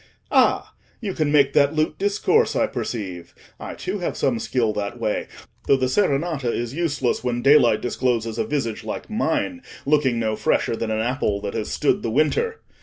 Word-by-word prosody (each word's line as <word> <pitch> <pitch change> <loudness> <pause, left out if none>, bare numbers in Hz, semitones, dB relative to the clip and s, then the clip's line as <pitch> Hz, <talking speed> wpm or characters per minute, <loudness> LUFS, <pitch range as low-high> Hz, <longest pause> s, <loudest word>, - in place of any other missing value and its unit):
Ah! - - +3 0.3
you 205 -5 -3
can 155 -4 0
make 140 -2 +4
that 140 +2 +3
lute 155 0 0
discourse, 205 - +2
I - - +3
perceive. 95 -7 -5 0.2
I, - - -7
too, 195 +2 -4
have 175 - -3
some 125 -4 +1
skill 115 0 0
that 105 +3 -4
way, 110 -2 -1 0.4
though 135 - +5
the 130 - 0
serenata 140 - 0
is 120 +1 -3
useless 145 -7 -1
when 120 -1 -1
daylight 125 -6 +5
discloses 120 -2 -1
a - - +2
visage 120 -7 -2
like 110 - -6
mine, 225 +5 -1 0.2
looking 140 -4 +2
no 110 -1 0
fresher 110 - +1
than 115 0 -3
an 110 0 0
apple 120 -4 0
that 100 -1 -4
has 110 -2 -3
stood 145 - +1
the 115 - -2
winter. 155 - +1
130 Hz, 180 wpm, -23 LUFS, 115-155 Hz, 0.4 s, though